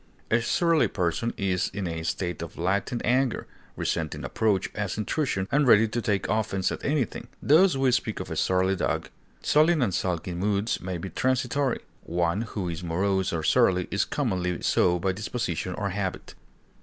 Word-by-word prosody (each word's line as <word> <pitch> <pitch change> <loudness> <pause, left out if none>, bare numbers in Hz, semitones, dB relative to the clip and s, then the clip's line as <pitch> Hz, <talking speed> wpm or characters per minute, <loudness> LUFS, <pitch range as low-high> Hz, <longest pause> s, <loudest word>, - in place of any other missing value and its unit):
A 120 +1 +4
surly 165 +6 +3
person 90 +4 -1
is 95 -3 0
in 100 -2 -2
a 80 -1 -3
state 85 0 -3
of 85 - -7
latent 100 +7 -1
anger, 130 0 +1 0.3
resenting 80 -2 -2
approach 105 -4 0
as 105 -2 -3
intrusion, 105 -3 -1
and 140 0 +3
ready 110 -1 +6
to 120 +2 -2
take 100 -5 0
offense 100 -2 0
at - - -5
anything; 140 -5 -1
thus 165 +3 +5
we 135 -1 +2
speak 120 -3 0
of - - -6
a - - -2
surly 95 +1 +2
dog. 90 - -1 0.3
Sullen 155 -1 +4
and 100 -6 0
sulky 90 -1 -2
moods 100 +4 0
may 90 -1 -3
be 95 +3 -6
transitory; 130 +1 0 0.2
one 85 +3 0
who 105 -5 -4
is 85 0 -4
morose 95 +2 0
or 80 -2 -2
surly 90 +2 +3
is 100 - +2
commonly 90 - -1
so 90 -1 +3
by 95 +2 0
disposition 95 -4 -3
or 100 -2 -2
habit. 95 -1 -4
100 Hz, 170 wpm, -26 LUFS, 90-120 Hz, 0.3 s, ready